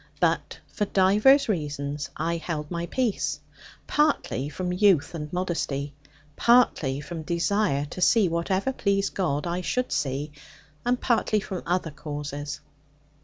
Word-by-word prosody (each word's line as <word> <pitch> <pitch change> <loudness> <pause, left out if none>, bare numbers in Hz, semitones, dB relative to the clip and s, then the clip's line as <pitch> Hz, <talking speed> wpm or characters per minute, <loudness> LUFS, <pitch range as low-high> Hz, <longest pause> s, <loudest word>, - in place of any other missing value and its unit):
But - - +1 0.2
for 210 - 0
divers 210 +9 +5
reasons 145 -6 -2
I 165 +2 -1
held 155 -2 -4
my 170 0 -3
peace, 245 -2 -1 0.5
partly 285 - +1
from 180 +4 -3
youth 185 -5 +3
and 150 -2 -5
modesty, 155 -6 -2 0.4
partly 160 - +3
from 165 +1 -6
desire 170 -2 0
to 185 - -6
see 210 +2 +5
whatever 185 +8 0
please 200 -4 0
God 150 -6 -1
I 175 +1 -2
should 250 +7 -1
see, 140 +2 -1 0.5
and 245 +1 +1
partly 225 -3 +2
from 190 -3 -5
other 175 -2 0
causes. 145 0 -6
170 Hz, 130 wpm, -26 LUFS, 150-200 Hz, 0.5 s, divers